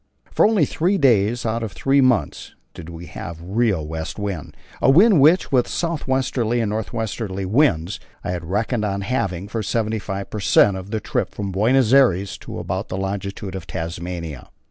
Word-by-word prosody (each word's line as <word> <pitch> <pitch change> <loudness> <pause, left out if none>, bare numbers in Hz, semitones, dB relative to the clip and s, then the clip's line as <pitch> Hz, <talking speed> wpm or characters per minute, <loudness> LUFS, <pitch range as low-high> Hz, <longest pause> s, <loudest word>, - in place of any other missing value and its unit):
For - - +4
only 215 -3 +3
three 185 +5 0
days 120 - +2
out 115 +1 -1
of 110 -3 -4
three 140 +1 +2
months 125 -4 0 0.2
did 85 -1 -10
we 85 0 -9
have 85 +1 -8
a 85 - -11
real 100 -4 0
west 80 0 -5
wind, 100 -8 -5 0.2
a - - +4
wind 180 +3 +6
which, 160 +6 +4
with 125 -3 +3
south 165 -4 -3
westerly 125 -3 0
and 110 -3 0
north 110 0 -3
westerly 110 -4 -3
winds, 100 - +1 0.2
I - - -2
had 90 -2 -4
reckoned 110 +5 -1
on 100 -1 -1
having 95 -4 -2
for 115 +1 -3
75 105 -2 -2
per 105 - -4
cent. 100 0 +4
of 95 +1 -7
the 110 0 -2
trip - - -2
from 100 -2 -3
Buenos 115 +5 +3
Aires 100 -8 +4
to - - -8
about - - -3
the - - -3
longitude 95 0 -4
of 95 -3 -7
Tasmania. 85 -3 -5
105 Hz, 190 wpm, -21 LUFS, 95-125 Hz, 0.2 s, wind